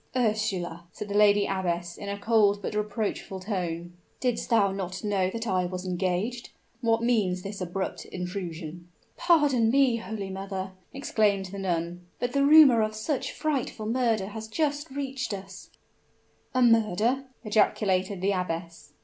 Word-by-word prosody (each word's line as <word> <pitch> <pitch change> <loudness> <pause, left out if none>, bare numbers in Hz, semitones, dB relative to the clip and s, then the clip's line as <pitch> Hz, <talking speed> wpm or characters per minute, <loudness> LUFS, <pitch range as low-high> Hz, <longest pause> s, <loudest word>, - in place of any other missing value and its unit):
"Ursula," 210 -8 -1
said 210 - -7
the - - -3
lady 205 -1 +5
abbess, 175 -2 -2
in 200 - -7
a 200 - -3
cold 205 -1 +3
but 200 - -4
reproachful 210 -2 -2
tone, 175 -3 -3 0.3
"didst 250 -3 -1
thou 210 -5 +4
not 190 0 -5
know 195 -3 +1
that 225 +3 -4
I 185 -4 +1
was 180 +1 -5
engaged? 185 +6 -2 0.3
What 230 -1 +1
means 200 -7 +1
this 200 0 -6
abrupt 185 +2 -3
intrusion?" 175 -2 -6 0.3
"Pardon 290 -9 +3
me, 260 -2 +4
holy 220 -4 -5
mother!" 190 0 -4 0.2
exclaimed 210 -8 +1
the 200 - -6
nun: 175 -1 -2
"but 245 0 -2
the 280 - +3
rumor 285 -5 +8
of 215 0 -1
such 260 +4 -2
a - - -8
frightful 270 -7 -2
murder 225 -4 +1
has 220 +1 -7
just 290 +5 -1
reached 270 -4 -3
us 195 -1 -10 0.4
" - - -37
"A 255 - +4
murder!" 230 +3 +3 0.2
ejaculated 200 -3 +1
the 195 +2 +2
abbess. 170 -4 -4
205 Hz, 155 wpm, -27 LUFS, 185-230 Hz, 0.4 s, rumor